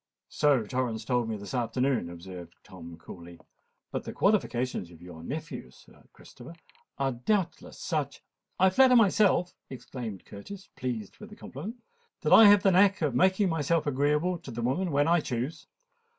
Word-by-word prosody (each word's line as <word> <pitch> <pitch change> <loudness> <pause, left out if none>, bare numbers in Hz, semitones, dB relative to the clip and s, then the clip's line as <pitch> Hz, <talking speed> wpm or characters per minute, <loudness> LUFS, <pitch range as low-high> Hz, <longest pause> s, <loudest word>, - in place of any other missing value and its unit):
"So 140 -7 +2
Torrens 115 -2 -3
told 120 -2 0
me 110 - -3
this 100 +4 -9
afternoon," 125 -4 0
observed 85 0 -10
Tom 85 -2 -11
coolly. 85 0 -12 0.5
"But - - -3
the - - -6
qualifications 130 - 0
of 85 -2 -15
your 90 -2 -11
nephew, 65 - -6
Sir 65 - -20
Christopher, 130 +8 -14 0.4
are 135 -1 0
doubtless 175 - -2
such——" 150 -5 -3 0.3
"I 190 +1 +4
flatter 255 +5 +5
myself," 200 -5 +3 0.2
exclaimed 120 -5 -8
Curtis, 190 - -11
pleased 120 -6 -5
with - - -11
this - - -13
compliment, 215 - -9 0.4
"that - - +2
I 225 - +10
have 205 -1 +7
the 195 - +5
knack 190 0 +4
of 145 -4 0
making 190 - +3
myself 165 0 0
agreeable 150 +5 0
to 160 - -11
the 120 -1 -5
women 175 +10 0
when 145 0 +2
I 170 +1 +4
choose. 130 +1 -4
135 Hz, 165 wpm, -28 LUFS, 110-180 Hz, 0.5 s, I